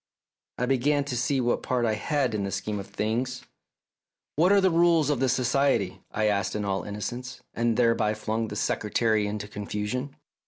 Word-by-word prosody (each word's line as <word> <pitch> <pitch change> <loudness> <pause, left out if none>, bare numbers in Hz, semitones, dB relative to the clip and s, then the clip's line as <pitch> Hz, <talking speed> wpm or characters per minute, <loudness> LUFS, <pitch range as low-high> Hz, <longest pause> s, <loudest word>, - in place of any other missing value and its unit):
I 125 - 0
began 140 +3 +2
to 140 -3 -4
see 130 +3 +1
what 120 -1 +1
part 125 -2 0
I 110 - +1
had 130 +2 0
in 105 -2 -1
the 100 - -2
scheme 105 +2 -3
of 100 - -7
things. 120 +4 -2 0.9
"What 175 +6 +4
are 200 - +6
the 190 -1 +3
rules 165 -3 +4
of 140 - 0
the 130 0 +2
Society?" 125 -5 +1
I 110 - -1
asked 105 0 0
in 105 -1 -2
all 95 -1 -1
innocence, 120 +5 -6
and 115 -1 0
thereby 115 -3 +2
flung 110 +1 -2
the - - -6
Secretary 110 0 +1
into 105 0 -4
confusion. 105 +6 -4
120 Hz, 185 wpm, -27 LUFS, 105-135 Hz, 0.9 s, are